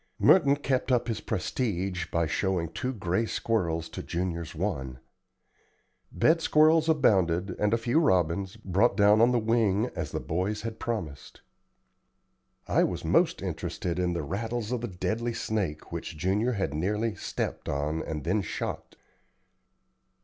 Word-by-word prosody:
Merton 140 -7 +5
kept 135 -2 -1
up 120 -1 +2
his 110 -2 -2
prestige 95 -3 -2
by 85 0 0
showing 85 +1 -1
two 125 +9 -3
gray 100 -1 -1
squirrels 85 -10 -1
to - - -6
Junior's 85 -2 -3
one. 70 -8 -3 1.1
Bed 165 +1 +3
squirrels 160 +1 +4
abounded, 95 - +3
and 105 0 +2
a 115 - +3
few 120 +6 +1
robins, 95 - +1
brought 105 +2 +1
down 105 +1 +5
on 120 +2 +5
the 125 - +2
wing 110 -1 +1
as 80 -4 -3
the - - -3
boys 95 +6 -2
had 115 -1 -5
promised. 85 -12 -5 1.3
I - - +3
was - - -2
most - - +2
interested 90 0 -3
in 90 -1 +1
the 85 -2 -2
rattles 110 - -3
of 125 -2 -1
the 120 - -3
deadly 115 +5 -2
snake 95 -9 -3
which - - -5
Junior 100 +9 +1
had 95 -9 -2
nearly 105 +8 -1
stepped - - -4
on 75 +3 -1
and 75 -3 -5
then - - +1
shot. - - -5
100 Hz, 150 wpm, -28 LUFS, 85-115 Hz, 1.3 s, Merton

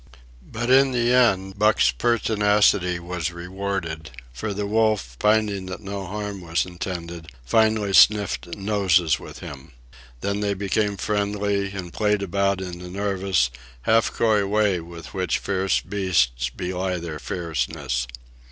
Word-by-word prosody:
But 120 +2 -1
in 135 0 +5
the 120 0 +2
end 100 -6 +2
Buck's 105 - +4
pertinacity 105 - +2
was 85 -1 -4
rewarded; 90 -2 -4 0.2
for 105 - -4
the 100 +1 -3
wolf, 105 - +1
finding 105 -3 +2
that 95 - -6
no 100 -2 -6
harm 105 0 -5
was 85 -2 0
intended, 85 -2 -6 0.2
finally 110 - +2
sniffed 105 -2 +5
noses 95 -6 +2
with - - -11
him. 70 +1 -10 0.5
Then 100 0 -1
they 100 -1 0
became 100 +1 0
friendly, 100 0 -1
and 90 -3 -6
played 105 -1 +1
about 100 0 0
in 90 -2 -6
the 90 0 -8
nervous, 95 -9 0 0.3
half 115 0 +3
coy 110 -3 +2
way 105 -3 +2
with 85 -1 -10
which 90 -3 0
fierce 95 -1 0
beasts 65 -12 0
belie 90 +5 -3
their 85 -3 -6
fierceness. 70 -6 -3
95 Hz, 135 wpm, -23 LUFS, 85-105 Hz, 0.5 s, in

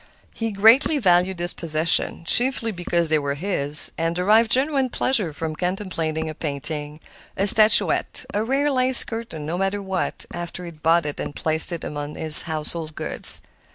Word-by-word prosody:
He 225 0 -6
greatly 225 +9 +1
valued 180 -5 -1
his 175 +1 -4
possessions, 165 +1 -2
chiefly 240 -1 0
because 175 -3 -3
they 155 -1 0
were 140 -1 -5
his, 150 -4 +4
and 165 +1 -4
derived 215 +5 0
genuine 265 +2 -1
pleasure 225 -8 -3
from 155 +1 -8
contemplating 165 -3 -6
a 155 - -8
painting, 150 0 -8 0.4
a 195 - -2
statuette, 215 +2 +2
a 210 - -3
rare 275 +5 -3
lace 255 -1 +7
curtain—no 175 -8 -8
matter 195 +1 -4
what—after 180 -2 -8
he 175 - -10
had 155 -2 -23
bought 165 +1 0
it 145 - -8
and - - -8
placed 160 +2 -2
it 170 - -8
among 145 0 -9
his 155 -1 +8
household 155 0 -2
gods. - - +6
175 Hz, 160 wpm, -19 LUFS, 155-220 Hz, 0.4 s, his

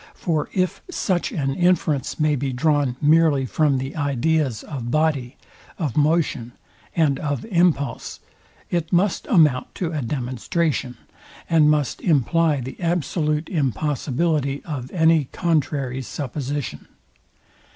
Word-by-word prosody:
For 155 -4 -1
if 185 -1 -1
such 185 - -1
an 135 -3 -1
inference 175 -5 +1
may 155 -1 +3
be 135 0 -2
drawn 145 -1 +1
merely 150 -2 +4
from 145 +1 +1
the 135 +2 -4
ideas 145 -3 0
of 130 -6 -6
body, 145 -4 0 0.4
of 150 -9 -2
motion, 150 -6 +1 0.4
and 150 -5 +2
of 145 -4 -3
impulse, 170 -6 +1 0.5
it 170 -2 -1
must 180 +2 +1
amount 150 - +3
to 170 -3 -2
a 155 -3 -2
demonstration, 130 - -2 0.5
and 155 -2 +4
must 150 -3 0
imply 155 -1 +2
the 130 +2 -8
absolute 160 -2 0
impossibility 145 - -1
of 130 -6 -5
any 160 -3 +3
contrary 140 -5 -1
supposition. 140 +1 -5
150 Hz, 120 wpm, -22 LUFS, 135-165 Hz, 0.5 s, merely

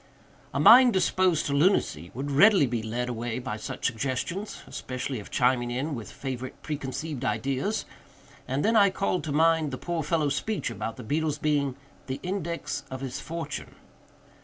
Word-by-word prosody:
A - - -2
mind 240 - +8
disposed 185 -3 +2
to 140 - -1
lunacy 145 - +2
would 140 +3 -3
readily 190 +3 +6
be 120 -3 -2
led 120 +3 -3
away 120 -1 -3
by 125 -3 -4
such - - -6
suggestions—especially 130 - -3
if 100 - -10
chiming 125 -1 +2
in 135 +6 -2
with 115 -7 -6
favorite 130 -1 -6
preconceived 145 -1 -4
ideas—and 135 -1 -3
then 225 +2 +3
I 200 -2 +6
called 190 -1 -1
to 155 - -3
mind 160 0 +3
the 130 - -5
poor 170 +2 -2
fellow's 150 -2 +1
speech 220 +4 -2
about 115 - -5
the - - -8
beetle's 150 +5 0
being 145 -3 0 0.3
"the 130 0 -3
index 175 -2 -3
of 130 0 -6
his 135 0 -4
fortune." 160 -3 -6
140 Hz, 160 wpm, -27 LUFS, 130-170 Hz, 0.3 s, mind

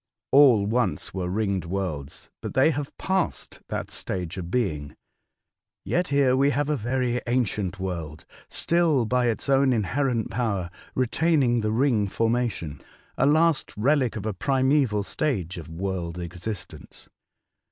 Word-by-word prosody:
All 130 -7 +6
once 105 -8 -1
were 90 -1 -2
ringed 100 -3 -1
worlds, 85 -6 -4
but - - -6
they 135 +5 +5
have 145 -1 -5
passed 190 -2 -2
that - - -4
stage 90 -3 -4
of 85 -1 -6
being. 80 -11 -1 0.9
Yet 180 +1 0
here 140 -2 +3
we 135 +2 +4
have 145 +1 0
a 150 - +2
very 125 0 -1
ancient 105 -6 0
world 85 -5 -5 0.2
still 165 -7 +2
by 125 +2 +1
its 115 +3 -1
own 135 -1 +4
inherent 120 +1 0
power 100 -7 -1 0.2
retaining 130 -1 +2
the 110 0 0
ring 115 -3 +2
formation, 115 -8 -1 0.2
— - - -31
a 135 - +2
last 160 -3 +2
relic 130 +1 +2
of 105 -2 -5
a 110 - -1
primaeval 130 -1 +2
stage 95 - -2
of 80 - -10
world 90 0 -4
existence." 90 +1 -7
115 Hz, 140 wpm, -25 LUFS, 95-135 Hz, 0.9 s, All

